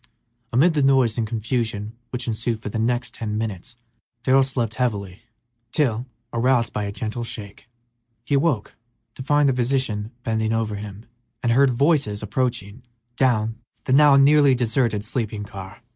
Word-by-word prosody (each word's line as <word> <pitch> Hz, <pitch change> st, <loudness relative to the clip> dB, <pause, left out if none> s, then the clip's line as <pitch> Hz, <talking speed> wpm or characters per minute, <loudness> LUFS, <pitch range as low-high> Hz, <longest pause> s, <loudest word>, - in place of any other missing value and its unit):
Amid 155 Hz, +9 st, +4 dB
the 150 Hz, -, +1 dB
noise 135 Hz, -5 st, +3 dB
and 115 Hz, -2 st, -1 dB
confusion 110 Hz, -1 st, -2 dB
which 125 Hz, -1 st, -4 dB
ensued 115 Hz, 0 st, -1 dB
for 110 Hz, -, -6 dB
the 110 Hz, -, -3 dB
next 120 Hz, +1 st, 0 dB
ten 105 Hz, -2 st, -4 dB
minutes 110 Hz, -1 st, -5 dB, 0.5 s
Darrell 135 Hz, +1 st, +5 dB
slept 125 Hz, -4 st, -1 dB
heavily, 105 Hz, -5 st, -2 dB, 0.5 s
till, 125 Hz, -4 st, 0 dB, 0.3 s
roused 120 Hz, -1 st, +2 dB
by 105 Hz, -, -2 dB
a 100 Hz, -, -3 dB
gentle 110 Hz, +3 st, -4 dB
shake, 105 Hz, 0 st, -8 dB, 0.6 s
he 145 Hz, -, -2 dB
awoke 140 Hz, -6 st, +1 dB, 0.4 s
to -, -, -9 dB
find 145 Hz, +2 st, +3 dB
the 135 Hz, -, +3 dB
physician 120 Hz, -4 st, 0 dB
bending 110 Hz, -1 st, 0 dB
over 110 Hz, -2 st, -1 dB
him 105 Hz, +1 st, -9 dB, 0.4 s
and 120 Hz, -, +2 dB
heard 135 Hz, +3 st, +5 dB
voices 130 Hz, -5 st, +1 dB
approaching 120 Hz, -1 st, -2 dB, 0.3 s
down 115 Hz, -4 st, +1 dB, 0.2 s
the 130 Hz, -, 0 dB
now 145 Hz, 0 st, +7 dB
nearly 140 Hz, 0 st, +6 dB
deserted 115 Hz, -3 st, 0 dB
sleeping 110 Hz, -3 st, -3 dB
car. 100 Hz, +2 st, -10 dB
115 Hz, 155 wpm, -23 LUFS, 110-130 Hz, 0.6 s, now